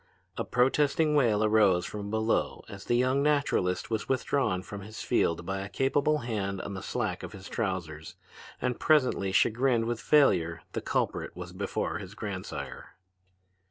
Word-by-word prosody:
A - - -2
protesting 145 +4 +2
wail 115 -7 +3
arose 105 -5 +4
from 100 -1 -5
below 110 +1 0
as 100 -2 -10
the 120 - +1
young 130 +3 +2
naturalist 140 -12 +1
was 110 -1 -2
withdrawn 130 -7 0
from 100 +1 -8
his 110 +2 -8
field 85 +1 +1
by 95 +1 -2
a 100 - -6
capable 145 +5 +1
hand 100 -4 -2
on 100 - -5
the 95 - -5
slack - - -2
of - - -8
his 95 0 -10
trousers. 90 -6 -4 0.4
And 125 -1 -2
presently, 130 -10 +3
chagrined 115 +4 +2
with 115 0 -2
failure, 85 - +3
the - - -3
culprit - - -2
was - - -8
before - - -2
his - - -9
grandsire. - - -6
110 Hz, 160 wpm, -29 LUFS, 95-130 Hz, 0.4 s, arose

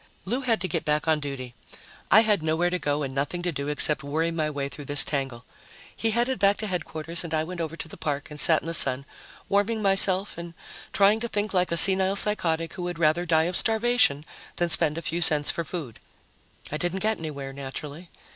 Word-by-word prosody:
Lou 255 +3 -2
had 235 -4 0
to 185 - -3
get 165 - -3
back 150 0 -1
on 160 -1 +2
duty. 135 -4 -7 0.6
I 215 - +7
had 210 -5 +1
nowhere 160 +3 0
to 180 - -2
go 145 -1 -2
and 135 -1 -5
nothing 145 +6 -3
to 175 - -1
do 140 -2 -5
except 150 0 +3
worry 160 +4 -2
my 155 -2 -2
way 140 -2 -4
through 140 +2 -9
this 145 +1 +8
tangle. 135 -4 -4 0.5
He 225 - -1
headed 240 +2 -1
back 200 +1 +3
to 220 - -5
Headquarters 170 -3 -4
and 165 -2 -4
I 155 - 0
went 175 +1 -6
over 160 0 -5
to 165 - -8
the - - -11
park 145 0 -4
and 150 - -9
sat 160 -3 +4
in - - -12
the 165 - -4
sun, 135 -3 +2 0.4
warming 205 +3 0
myself 195 -2 +3
and 170 0 -9 0.4
trying 200 +2 +3
to 235 - -4
think 210 -2 -3
like 180 -2 0
a 170 - 0
senile 190 +3 +5
psychotic 170 -6 -1
who - - -7
would 175 -1 -5
rather 165 +2 +1
die 160 -1 +3
of 175 +2 -3
starvation 225 - +2 0.3
than 175 0 0
spend 160 -2 +4
a 165 - -6
few 165 +2 -3
cents 150 -3 +4
for 170 - -4
food. 155 -7 -8 0.7
I 150 - -3
didn't 175 +5 -3
get 220 0 0
anywhere, 140 -4 -7
naturally. 140 +5 -8
165 Hz, 220 wpm, -25 LUFS, 150-190 Hz, 0.7 s, this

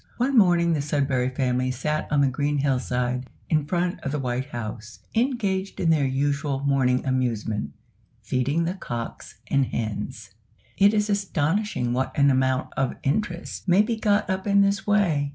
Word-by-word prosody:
One 265 +3 +1
morning 175 -6 +4
the 155 - 0
Sudberry 140 -3 0
Family 130 -1 0
sat 150 +4 -2
on 145 -1 +3
the 140 - +4
green 145 +3 0
hill 135 -2 +1
side, 125 0 -2 0.2
in 155 -2 +2
front 175 +1 -1
of 140 -4 -4
the 150 - -1
White 130 -1 -2
House, 115 -2 -7
engaged 210 -6 -1
in 165 - +2
their 145 -4 +3
usual 140 +1 -1
morning 135 -2 +1
amusement 120 -5 -1 0.5
feeding 140 +6 0
the 170 +2 -1
cocks 120 -11 -6 0.2
and 140 -2 +3
hens. 110 -2 -4 0.4
It 205 +2 +4
is 210 0 +2
astonishing 190 - 0
what 130 +1 -2
an 140 -1 +5
amount 130 0 0
of 135 -2 0
interest 175 +5 -2
may 185 +3 +5
be 230 +1 -1
got 210 -1 +1
up 190 0 -2
in 200 0 +5
this 200 0 +1
way! 170 -9 +2
145 Hz, 170 wpm, -25 LUFS, 130-190 Hz, 0.5 s, an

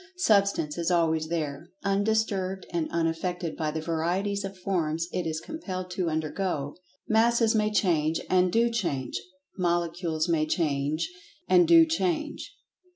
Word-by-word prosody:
Substance 200 - +2
is 170 - 0
always 160 -2 +2
there, 155 -1 -3
undisturbed 200 -2 0
and 170 -2 -1
unaffected 170 +1 -2
by 155 -1 -1
the 160 +1 -3
varieties 180 +5 -1
of 195 0 -6
forms 170 -3 -1
it 175 -2 -1
is 155 -1 -2
compelled 185 - -6
to 180 -2 -1
undergo. 155 -1 -2 0.3
Masses 230 +1 +3
may 215 -1 +2
change—and 180 0 +2
do 235 +3 +3
change. 170 - -2 0.4
Molecules 170 -2 0
may 160 -2 +1
change—and 170 - 0
do 165 -1 +8
change. 170 +1 -2
175 Hz, 125 wpm, -27 LUFS, 160-195 Hz, 0.4 s, do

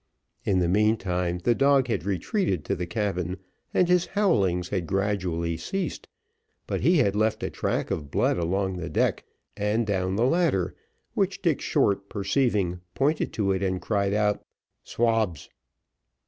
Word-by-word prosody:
In 95 - +2
the 90 -2 +2
meantime, 90 -3 +1
the 120 - +4
dog 140 +1 +4
had 100 -8 -2
retreated 95 - -1
to - - 0
the 90 0 -4
cabin, 90 -2 -2 0.3
and 180 - +3
his 180 0 +3
howlings 95 - +1
had 90 -4 -2
gradually 90 -4 -1
ceased; 195 - -4 0.6
but - - -2
he 175 - +4
had 100 -8 +2
left 110 0 +1
a - - -2
track - - -2
of 75 -3 -3
blood - - +2
along 95 +2 -1
the 90 - -5
deck, - - 0 0.3
and 105 +3 0
down 95 -2 0
the 115 +4 +2
ladder, 140 - +1 0.4
which - - -1
Dick - - +2
Short 100 -1 +1
perceiving, 100 -4 0
pointed 145 +4 +1
to 100 -3 +1
it, 95 0 0
and 95 -1 0
cried 100 -1 0
out 105 -1 +1 0.4
"Swabs." 110 -9 0
100 Hz, 155 wpm, -26 LUFS, 90-115 Hz, 0.6 s, the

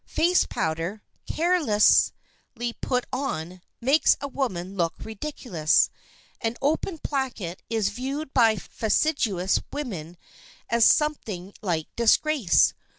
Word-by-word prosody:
Face 350 +3 +2
powder, 165 +4 -3 0.2
carelessly 240 -6 +1
put 250 -1 0
on, 185 - -3 0.2
makes 270 +6 +4
a 280 - -4
woman 200 -9 -3
look 170 -3 0
ridiculous. 220 - 0 0.5
An 225 0 -2
open 320 +4 -1
placket 250 - -3
is 220 -3 +1
viewed 270 +6 -5
by 230 -4 +5
a - - -7
fastidious 210 - 0
woman 180 - -6 0.5
as 235 -1 +4
something 210 - +1
like 170 -6 -1
disgrace. 235 - +3
230 Hz, 105 wpm, -25 LUFS, 185-280 Hz, 0.5 s, by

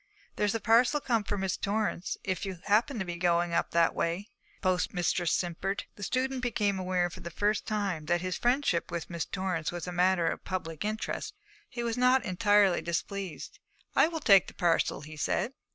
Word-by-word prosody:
'There's 210 +1 +1
a - - 0
parcel 240 +6 +4
come 230 -6 0
for 205 - -2
Miss 190 -1 -1
Torrance, 205 -3 -1
if 185 -3 -2
you 190 -3 -4
happen 225 +6 +2
to 190 - -2
be 175 -1 -5
going 175 -1 +1
up - - +1
that 170 0 +3
way,' 175 +5 -2 0.3
the - - -36
postmistress 180 -2 +1
simpered. 185 +3 -1
The - - -13
student 255 +5 -1
became 210 -5 0
aware 180 -1 0
for - - -10
the 170 - -6
first 205 +5 0
time 195 -8 -2
that 175 +1 +2
his 185 -1 -2
friendship 245 -8 +1
with 170 0 -5
Miss 170 -1 -2
Torrance 185 -4 -2
was 175 -2 -5
a 180 - -4
matter 180 0 +2
of 165 - -2
public 165 -4 -4
interest. 215 - -3 0.3
He 240 -4 -4
was 235 +1 -2
not 255 +1 +4
entirely 200 0 +3
displeased. 180 +1 -4 0.4
'I - - +6
will 330 -1 -4
take 200 -8 +6
the - - -11
parcel,' 170 -4 +1
he 155 +1 -10
said. 195 - -1
190 Hz, 195 wpm, -29 LUFS, 175-215 Hz, 0.4 s, I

